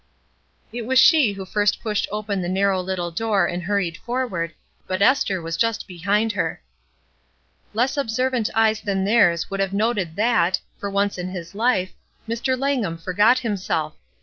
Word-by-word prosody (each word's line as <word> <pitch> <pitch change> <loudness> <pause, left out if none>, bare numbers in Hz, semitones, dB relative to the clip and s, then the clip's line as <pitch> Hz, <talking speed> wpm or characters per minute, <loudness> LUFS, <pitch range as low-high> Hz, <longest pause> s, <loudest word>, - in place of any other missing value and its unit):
It 235 -1 -5
was 260 0 +2
she 265 -5 +6
who 195 -1 -7
first 205 +1 +1
pushed 215 -3 -1
open 210 -2 -2
the 175 - -3
narrow 190 0 +1
little 180 -2 -3
door 205 0 +1
and 175 +1 -3
hurried 180 -2 -1
forward, 230 -10 -3 0.3
but 185 0 -2
Esther 200 -3 +3
was 165 0 -3
just 230 +5 0
behind 200 +5 0
her. - - -3 1.1
Less 250 +5 +1
observant 255 -2 0
eyes 220 -1 +3
than 195 -2 -1
theirs 195 -7 +3
would 195 - -3
have 195 0 0
noted 200 -6 0
that, 190 -5 +2 0.2
for 200 - -3
once 200 -1 0
in 180 +1 -3
his 180 -2 -7
life, 205 -4 +1 0.3
Mr. 240 +3 -1
Langham 250 -11 -1
for 175 +3 -6
got 210 +7 +5
himself. 185 -8 -2
200 Hz, 165 wpm, -22 LUFS, 185-230 Hz, 1.1 s, she